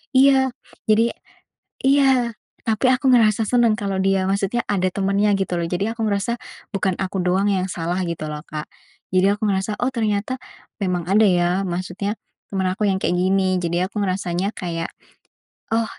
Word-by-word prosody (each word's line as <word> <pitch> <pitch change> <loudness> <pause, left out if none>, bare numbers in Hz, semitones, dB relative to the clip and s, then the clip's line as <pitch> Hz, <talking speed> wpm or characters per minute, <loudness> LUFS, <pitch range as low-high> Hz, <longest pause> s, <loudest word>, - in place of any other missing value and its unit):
Iya, 265 -1 +5 0.4
jadi 225 +2 +4 0.7
iya, 265 -4 +4 0.3
tapi 225 +4 +2
aku 260 +1 +2
ngerasa 220 -2 +4
seneng 235 -3 +4
kalau 195 -2 -2
dia 195 -1 +2
maksudnya 200 +4 0
ada 185 -2 +1
temennya, 200 +1 +2
gitu 190 -2 -1
loh, 170 - -1
jadi 200 +5 -1
aku - - -4
merasa 200 +3 0 0.4
bukan 190 -2 0
aku 190 0 -2
doang 185 +2 +2
yang 190 -1 0
salah, 175 +2 -2
gitu 170 -2 -4
loh, 150 - -5
Kak. 150 -1 -5 0.5
Jadi 185 +1 +4
aku 210 +1 -1
ngerasa, 195 +2 -1
oh, 250 - +1
ternyata 220 +2 -1 0.4
memang 180 -3 -1
ada, 210 +3 +5
ya, 180 +1 +2
maksudnya 185 +4 -3 0.3
teman 190 -1 -1
aku 210 +1 0
yang 190 - +1
kayak - - +1
gini, 185 0 +2
jadi 175 +1 0
aku 210 - -4
merasanya 185 0 -1
kayak, 170 -3 -4 0.8
oh, 225 0 +2
195 Hz, 165 wpm, -22 LUFS, 185-220 Hz, 0.8 s, Iya